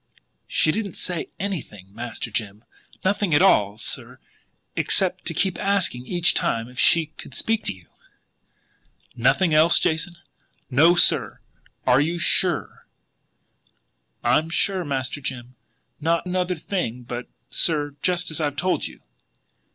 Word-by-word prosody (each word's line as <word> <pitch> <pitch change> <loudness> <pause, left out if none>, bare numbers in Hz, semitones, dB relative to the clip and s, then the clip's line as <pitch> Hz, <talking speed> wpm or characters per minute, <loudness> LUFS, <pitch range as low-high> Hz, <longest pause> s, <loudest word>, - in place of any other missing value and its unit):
"She 155 - +2
didn't 205 -1 -4
say 175 -3 -3
anything, 110 - -6
Master 115 +1 -5
Jim. 105 -1 -3 0.4
Nothing 195 -4 +1
at 155 - +5
all, 105 - +4
sir 110 - -4 0.6
except - - +1
to - - 0
keep 190 -1 0
asking 190 -11 +1
each 175 0 +3
time 115 -10 0
if 125 +1 -10
she 165 -1 +5
could - - -8
speak 225 -1 0
to - - +2
you." 90 -3 -19 1.3
"Nothing 135 +8 +2
else, 155 +2 +5
Jason?" 165 +2 0 0.6
"No, 160 +7 +5
sir." 150 - +3 0.5
"You 145 +7 +3
are - - -5
SURE?" - - +1 1.4
"I'm 150 +7 +2
sure, 185 +2 +1
Master 140 -1 -2
Jim. 125 -1 -5 0.4
Not 165 +3 0
another 180 0 -1
thing 150 - -4
but 120 +1 -6
that, - - -17
sir, 145 -3 +1
just 180 -2 +1
as 155 - -1
I've 145 -2 -1
told 180 +5 0
you." - - -14
155 Hz, 135 wpm, -23 LUFS, 125-180 Hz, 1.4 s, at